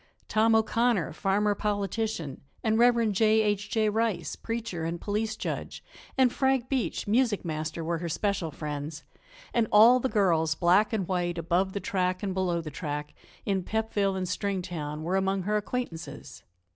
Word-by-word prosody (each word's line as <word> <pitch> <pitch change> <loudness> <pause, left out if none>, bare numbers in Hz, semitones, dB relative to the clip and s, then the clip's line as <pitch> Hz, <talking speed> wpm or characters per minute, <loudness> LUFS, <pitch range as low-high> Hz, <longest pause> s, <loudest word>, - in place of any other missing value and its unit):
Tom 225 +1 +3
O'Connor, 225 -4 +2
farmer 205 +4 +1
politician, 205 - -2 0.2
and 220 0 +2
Rev. 235 -2 +4
J. 220 +2 +4
H. 210 -1 -1
J. 220 -1 +1
Rice, 210 -7 -1
preacher 230 -7 -4
and 165 +1 -3
police 215 +3 -2
judge, - - -5 0.3
and 255 -2 +4
Frank 265 -2 +1
Beach, 265 -3 -1
music 225 -2 +2
master, 160 +1 -3
were 165 +1 -1
her 170 0 -4
special 200 0 -1
friends, 150 0 -5 0.5
and 230 -2 +2
all 230 +4 +7
the 260 - -1
girls, 165 -7 +2
black 180 +6 +3
and 205 -6 -1
white, 175 -2 -1
above 175 +3 0
the 200 - -2
track 185 -1 -1
and 195 -2 -1
below 180 -2 0
the 155 -2 -7
track, 150 -1 -5 0.3
in 195 -2 +1
Pepville 205 -1 0
and 185 -1 -2
Stringtown, 175 -5 -3
were 180 +4 0
among 195 0 0
her 210 +3 0
acquaintances. 210 -5 -4
195 Hz, 160 wpm, -28 LUFS, 170-220 Hz, 0.5 s, all